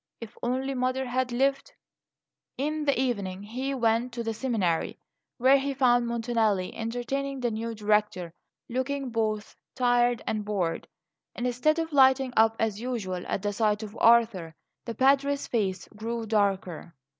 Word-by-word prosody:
If 230 -1 -9
only 260 +3 -1
mother 255 +1 -1
had 255 0 -1
lived 275 +3 0 0.8
In 300 +2 -2
the 280 -4 +2
evening 200 -7 -2
he 260 +6 -3
went 230 0 +1
to 235 0 -4
the 225 0 -2
seminary, 210 -9 -1 0.4
where 265 +3 +5
he 275 0 -2
found 245 -2 +3
Montanelli 225 -5 0
entertaining 260 +4 -3
the 240 -2 -1
new 225 +1 -4
Director 210 -5 0 0.3
and 245 - -5
looking 270 0 -2
both 215 -2 -2 0.2
tired 245 -1 +2
and 215 -1 -2
bored. 190 -6 -2 0.5
Instead 250 +6 +1
of 325 -1 -3
lighting 265 -2 +4
up, 225 0 +4
as 220 -1 -1
usual, 200 -8 -3
at 190 - -2
the 205 0 -1
sight 210 0 +1
of 210 -1 -8
Arthur, 225 -9 +4 0.3
the 230 - -5
Padre's 280 +3 +2
face 195 -5 -2
grew 225 +2 -5
darker. 195 -6 -1
235 Hz, 150 wpm, -27 LUFS, 210-260 Hz, 0.8 s, where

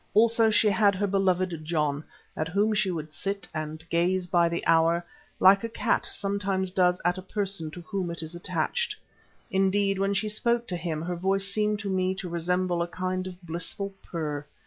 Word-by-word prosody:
Also 225 +1 +5
she 215 0 +4
had 200 0 +3
her 205 +2 0
beloved 185 -4 +1
John, 150 -2 0 0.3
at 155 - -2
whom 205 +6 +1
she 210 -2 +2
would 155 -3 -4
sit 195 +1 -3
and 155 +1 -5
gaze 180 +2 +2
by 170 -1 +3
the 170 - -3
hour 165 +1 +3 0.3
like 195 +2 +6
a 230 - -2
cat 230 +1 +1
sometimes 195 -2 -1
does 180 -1 +3
at 180 +1 +2
a - - -6
person 195 -4 -2
to 175 +3 -9
whom 185 0 -3
it 170 -1 -5
is 160 +1 -6
attached. 470 - -1 0.6
Indeed, 195 0 +2
when 195 +1 +1
she 205 +2 0
spoke 235 +3 +1
to 180 - -1
him, 165 -2 -3
her 175 +1 -2
voice 195 +2 0
seemed 210 +1 +1
to 205 - -4
me 185 0 +1
to 190 -1 -5
resemble 175 +1 0
a 170 - 0
kind 185 +1 -3
of 180 -1 -9
blissful 175 +4 -3
purr. 150 -4 -4
185 Hz, 190 wpm, -27 LUFS, 170-200 Hz, 0.6 s, like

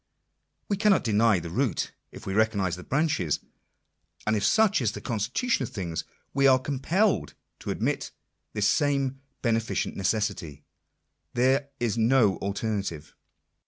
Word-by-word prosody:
We 200 - 0
cannot 205 -2 +4
deny 110 -2 +3
the 85 -1 -5
root, - - 0 0.2
if - - -11
we 95 - -3
recognise 100 -4 +1
the 90 - -10
branches. 135 - 0 0.9
And 110 - +2
if 105 - -1
such 215 - +4
is 110 -4 0
the 105 - -6
constitution 120 - -1
of 130 - -2
things, 85 -5 -4 0.3
we 140 0 +4
are 130 -1 +6
compelled 150 +10 0 0.2
to - - -7
admit - - -1 0.4
this 105 -1 +1
same 135 +1 +1
" - - -47
beneficent 115 -2 0
necessity." 95 -7 -2 0.7
There 135 +3 +2
is 115 -1 0
no 115 -4 +4
alternative. 100 - -3
115 Hz, 140 wpm, -27 LUFS, 100-135 Hz, 0.9 s, are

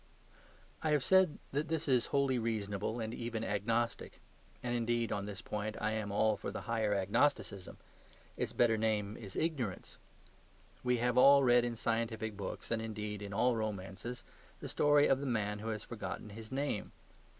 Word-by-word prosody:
I 155 - 0
have 145 -3 +2
said 190 -4 +4
that 145 +3 -1
this 160 -1 -1
is 125 -4 +3
wholly 140 -3 +2
reasonable 110 0 -2
and 110 0 -3
even 115 -2 -3
agnostic. 115 +3 -1 0.4
And, 120 -1 -1
indeed, 120 0 0
on 100 0 -2
this 100 -2 -7
point 105 0 -3
I 110 0 0
am 110 -2 -2
all 110 +1 +3
for - - -5
the - - -5
higher 110 -2 0
agnosticism; 100 0 0 0.6
its - - -2
better 115 -2 +3
name 105 -2 0
is 100 -5 -9
Ignorance. 130 - -2 0.8
We 125 0 +2
have 125 +1 +2
all 140 +1 +8
read 120 -1 +5
in 120 -1 -2
scientific 110 -1 -1
books, 100 +2 -6
and, 115 -1 +1
indeed, 105 -2 -4
in 100 -1 -6
all 120 +4 +2
romances, 110 +2 -4 0.4
the - - -6
story 145 0 +4
of 135 - +3
the 140 - -3
man 105 -4 -1
who 110 - -6
has 110 -1 -3
forgotten 110 -2 -6
his 110 +2 -10
name. 135 -6 -2
115 Hz, 170 wpm, -34 LUFS, 105-125 Hz, 0.8 s, all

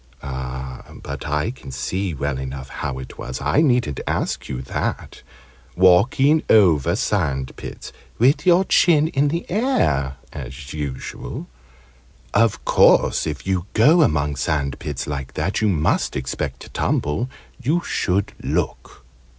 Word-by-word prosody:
But 65 -1 -6
I 75 +9 0
can 125 - -12
see 90 +6 -2
well 70 -1 -2
enough 65 0 -6
how 70 -2 -4
it 65 - -9
was 65 0 -5
I 150 - +2
needn't 125 - +2
ask - - -2
you 65 -1 -4
that 65 - -4 0.5
walking 120 - +5
over 85 -10 +5
sand 65 -1 -1
pits - - -9 0.2
with 130 +6 +3
your 180 +1 +5
chin 160 -5 +4
in 140 -1 +2
the 165 +4 -2
air, 175 - +1 0.2
as 70 +1 -8
usual. 70 -4 -5 0.9
Of 115 0 +2
course - - +4
if 75 -2 -5
you 95 -1 -1
go 150 +10 +6
among 75 - +1
sand 70 -3 -1
pits 70 -4 -4
like 70 -2 -5
that, 90 +8 -1
you 110 - +3
must 80 -5 +1
expect 65 0 -3
to - - -10
tumble. 105 - -1 0.3
You 155 +8 +1
should 100 - -1
look." - - -3
75 Hz, 135 wpm, -21 LUFS, -, 0.9 s, go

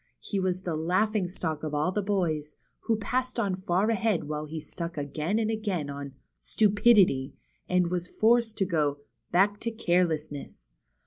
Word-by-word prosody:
He 200 - -3
was 185 -1 -1
the 170 -3 -2
laughing 185 +5 +1
stock 160 -4 -3
of 155 -1 -3
all 150 +5 +1
the 210 - -1
boys, 165 -7 -1 0.3
who 225 - +3
passed 255 +4 -2
on 200 -5 +1
far 185 +3 +1
ahead 220 -4 +1
while 150 0 -4
he 160 +1 -5
stuck 170 +2 -6
again 150 +7 -1
and 225 -1 +1
again 195 -10 -2
on 140 -1 -7 0.2
" - - -53
Stupidity," 205 - +4 0.3
and 180 -1 +2
was 180 -1 -1
forced 225 +1 +2
to 195 - +2
go 150 -5 0 0.3
back 205 +3 +3
to 230 - -2
Careless 175 -8 +1
ness." - - -10
180 Hz, 175 wpm, -28 LUFS, 155-210 Hz, 0.3 s, Stupidity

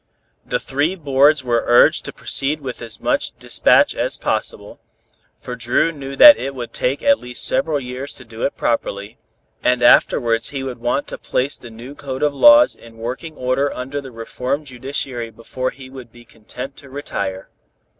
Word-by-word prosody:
The - - -1
three 145 +7 -1
boards 145 -2 +3
were 120 -2 +1
urged 120 0 +5
to - - -5
proceed 145 +3 -2
with 130 -4 -7
as 115 -1 -8
much - - -1
despatch - - +3
as - - -2
possible, - - -3 0.6
for - - -7
Dru 165 - +1
knew 140 -3 -8
that 295 - +10
it 135 0 -5
would 120 -2 -7
take 135 +3 -1
at 280 0 +4
least 125 0 -3
several 145 +3 +1
years 130 +2 -7
to 130 - -13
do 115 0 -11
it - - -1
properly, 105 -2 -2 0.4
and 125 -1 +1
afterwards 115 -1 +4
he 135 -2 -5
would 130 -3 -6
want 120 +4 -1
to - - -7
place 135 +3 -1
the 120 - -10
new 120 +5 -10
code 135 -1 -6
of 145 -1 +2
laws 295 - +7
in 115 -1 -16
working 130 +8 -6
order 130 +2 0
under 135 +3 -5
the 135 -2 -10
reformed 125 +5 -4
judiciary 125 -2 -4
before 115 +3 -4
he 130 -1 -12
would 130 -3 -12
be 120 0 -17
content 125 +5 -9
to 140 - -13
retire. 100 -9 -5
130 Hz, 180 wpm, -19 LUFS, 120-140 Hz, 0.6 s, that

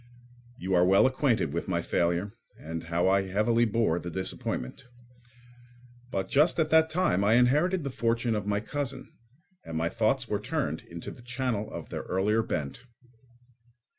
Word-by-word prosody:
You 95 +2 -3
are 90 -1 +5
well 95 +2 +5
acquainted 130 -2 +1
with - - -3
my - - -1
failure 85 +4 0 0.2
and 80 +1 -6
how 85 +1 0 0.2
heavily 105 +5 +2
I - - -2
bore 105 -6 +1
the 85 - -6
disappointment. 95 - -4 1.2
But 95 -5 -2
just 155 +5 +3
at 155 -1 +1
that 160 0 +5
time 155 - +1
I 105 +3 +4
inherited 150 +9 +3
the 140 - -3
fortune 115 -1 0
of 105 -2 -2
my 105 0 0
cousin, 135 +2 -5 0.5
and 80 - -5
my 80 +1 0
thoughts 115 +5 0
were 105 - -1
turned 80 +2 -2
into 85 0 -8
the - - -13
channel 120 -3 -3
of - - -7
their - - -4
earlier 105 +4 +1
bent. 75 - -4
110 Hz, 165 wpm, -28 LUFS, 90-130 Hz, 1.2 s, are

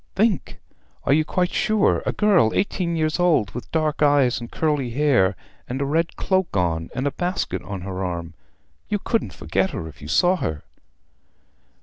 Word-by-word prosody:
"Think; 210 0 0 0.4
are - - +3
you 155 +2 +4
quite 180 +3 0
sure? 215 -1 +2
A - - +2
girl, 190 - +3
eighteen 180 -3 0
years 155 +1 0
old, 165 - +3
with 125 - -8
dark 155 -2 0
eyes 145 -5 +4
and 120 - -7
dark - - -14
curly 150 -5 +1
hair, 120 -8 +2 0.3
and 130 +2 -3
a 140 - 0
red 160 +4 0
cloak 190 - 0
on, 85 -2 0
and 130 +2 -2
a 145 - +1
basket 180 +5 -2
on 100 -2 -6
her 95 0 -4
arm? 85 -2 -4 0.6
You 210 - +1
couldn't 225 +3 -1
forget 90 +5 -1
her 80 - -5
if 75 -2 -13
you 75 - -8
saw 175 - +3
her." 80 - -3
145 Hz, 185 wpm, -23 LUFS, -, 0.6 s, you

